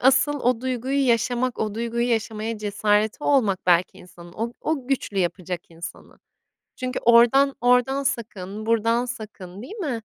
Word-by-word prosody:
asıl 270 +3 +3
o 245 -2 +1
duyguyu 260 +2 -1
yaşamak, 245 +1 +1
o 215 -1 -2
duyguyu 235 +1 -1
yaşamaya 225 -1 -2
cesareti 210 +4 0
olmak 215 -11 +2
belki 180 +2 +3
insanın 175 -2 -14
o 230 +5 -4
o 290 -5 -2
güçlü 255 -7 -1
yapacak 180 -1 -2
insanı. 165 0 -10 0.6
Çünkü 255 0 -3
oradan 240 +4 +5
oradan 250 +3 +3
sakın, 215 -5 -4
buradan 230 +2 +2
sakın, 205 -5 -8
değil 375 - -9
mi? 285 - -3
230 Hz, 140 wpm, -24 LUFS, 205-255 Hz, 0.6 s, oradan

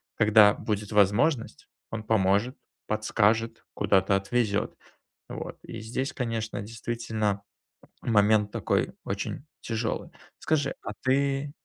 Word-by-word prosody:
Когда 105 -1 +6
будет 105 -2 -3
возможность, 105 - +2 0.2
он 110 -1 -4
поможет, 105 +3 +2 0.3
подскажет, 110 +1 +1
куда-то 95 0 +3
отвезет. 100 +1 0 0.6
Вот. - - -6
И 115 - -7
здесь, 130 +5 -3
конечно, 115 -4 -3
действительно, 110 -2 -3 0.6
момент, 105 -2 +3
такой, - - 0
очень 135 - -4 0.2
тяжелый. 115 0 -3 0.3
Скажи, 145 -3 0
а - - -4
ты 140 +2 +1
110 Hz, 105 wpm, -27 LUFS, 105-120 Hz, 0.6 s, Когда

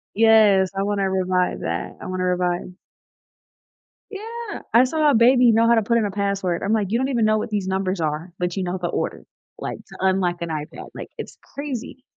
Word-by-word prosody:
Yes, 210 -4 +5
I 195 - -1
wanna 200 -1 0
revive 185 -1 0
that. - - -4
I - - -8
wanna 185 0 -3
revive 180 0 -1 1.4
Yeah! 445 +2 -7
I 235 - +7
saw 300 +3 +2
a - - +2
baby 245 +1 +6
know 225 +1 +4
how 235 - +5
to 225 - +3
put 235 +3 +2
in 225 - +1
a 205 - -2
password, 195 -3 -1
I'm 205 +3 +1
like, 210 -3 +1
"You 230 - +2
don't 265 - 0
even 235 -4 +1
know 215 0 +3
what 215 - -4
these 205 -3 -2
numbers 190 -1 -1
are, 155 +3 -2
but 180 -1 -2
you 190 - -1
know 180 +1 -2
the 175 - -2
order," - - -3 0.3
like, - - -5
"to - - -13
unlock 185 -2 +1
an 170 - -4
iPad," 155 0 -6
like, - - -8
it's - - -8 0.2
crazy, 265 -2 -6
200 Hz, 210 wpm, -22 LUFS, 185-230 Hz, 1.4 s, I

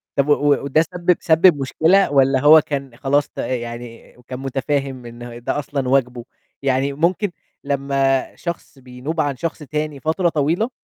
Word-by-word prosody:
طب 140 +1 +1
و 145 0 +4
وده 140 +3 +2
سبِّب 175 +1 0
سبِّب 165 0 +4
مشكلة؟ 165 +7 +3
والّا 135 -1 +3
هو 155 +3 +7
كان 140 -5 -5
خلاص 145 +1 +1
ت - - -31
يعني 120 -1 -6
كان 130 0 -6
متفاهم 135 -1 -3
إن 120 0 -10
ده 145 - -1
أصلًا 140 -2 -3
واجبه؟ 125 -3 0 0.4
يعني 135 +1 0
ممكن 175 +6 0 0.3
لمّا 135 -1 0
شخص 170 -5 -7
بينوب 130 +6 -4
عن 140 -2 -1
شخص 165 +3 -4
تاني 150 -1 -4
فترة 165 +4 0
طويلة، 165 - 0
140 Hz, 155 wpm, -20 LUFS, 130-155 Hz, 0.4 s, هو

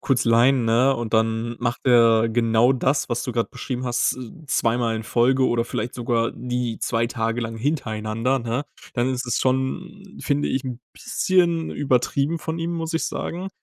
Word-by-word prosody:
kurz 130 -2 +1
leihen,“ 120 +2 +4
ne, 120 +4 +3
und 120 -1 -3
dann 115 +1 0
macht 120 0 -2
er 115 -2 +5
genau 115 +2 +3
das, 135 +2 0
was 120 -1 -1
du - - -3
grad 115 -1 -1
beschrieben 130 -1 -4
hast, 120 -1 +1
z 130 +4 -9
zweimal 115 -2 +1
in 110 - -5
Folge 130 +3 +2
oder 115 -1 +1
vielleicht 120 0 -4
sogar 115 -1 0
die 125 -2 -3
2 115 0 0
Tage 115 0 -2
lang 115 -1 -4
hintereinander, 115 -1 -1
ne, 120 +4 -2 0.3
dann 120 +1 +1
ist 130 -1 -2
es 120 - 0
schon, 130 +9 -1 0.2
finde 145 0 0
ich, 130 0 -1
'n 125 -2 -5
bisschen 170 -3 +1
übertrieben 140 +4 0
von 160 +2 -4
ihm, 165 +1 -2
muss 165 0 -3
ich 165 - 0
sagen. 185 +3 -4
125 Hz, 180 wpm, -23 LUFS, 115-135 Hz, 0.3 s, er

